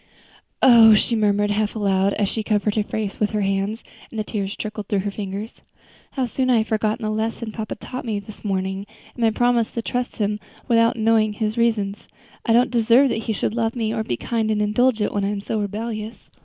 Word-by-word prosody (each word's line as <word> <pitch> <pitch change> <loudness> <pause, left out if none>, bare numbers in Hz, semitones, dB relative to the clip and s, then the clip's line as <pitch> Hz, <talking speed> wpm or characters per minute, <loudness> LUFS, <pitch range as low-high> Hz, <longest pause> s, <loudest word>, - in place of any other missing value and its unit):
"Oh!" 230 -3 +8
she 230 +3 +1
murmured 205 -1 +2
half 210 +1 0
aloud 195 -2 +1
as 205 -1 +1
she 220 - -2
covered 210 -1 0
her 215 - +1
face 210 -1 -4
with 210 - +2
her 210 - 0
hands, 195 +3 -1 0.3
and 225 - -6
the - - 0
tears 200 -2 -3
trickled 210 -1 -5
through 200 -2 0
her 205 - -1
fingers, 200 +2 -6 0.5
"how 265 -2 0
soon 255 +2 -1
I 245 - +5
have 220 0 0
forgotten 220 +1 0
the 215 - -1
lesson 220 +1 -2
papa 215 -1 -5
taught 255 +4 -7
me 220 -3 -2
this 200 +1 -12
morning, 190 0 -2 0.3
and 240 - -9
my 225 - +5
promise 235 0 +2
to 230 - -4
trust 245 +1 -3
him 210 -1 -1 0.3
without 230 -1 +3
knowing 220 -1 +3
his 215 0 -2
reasons. 220 -4 0 0.4
I - - +3
don't 240 +2 +4
deserve 240 +3 +4
that 220 -2 -2
he 220 - 0
should 210 - -1
love 230 0 -1
me 220 -2 -1
or 220 -2 -1
be 120 - -3
kind 225 - -1
and 215 -1 +1
indulgent, 215 +1 +1
when 205 - 0
I - - +1
am 205 -1 -2
so 215 +2 -3
rebellious." 215 +2 -5
215 Hz, 220 wpm, -22 LUFS, 205-230 Hz, 0.5 s, Oh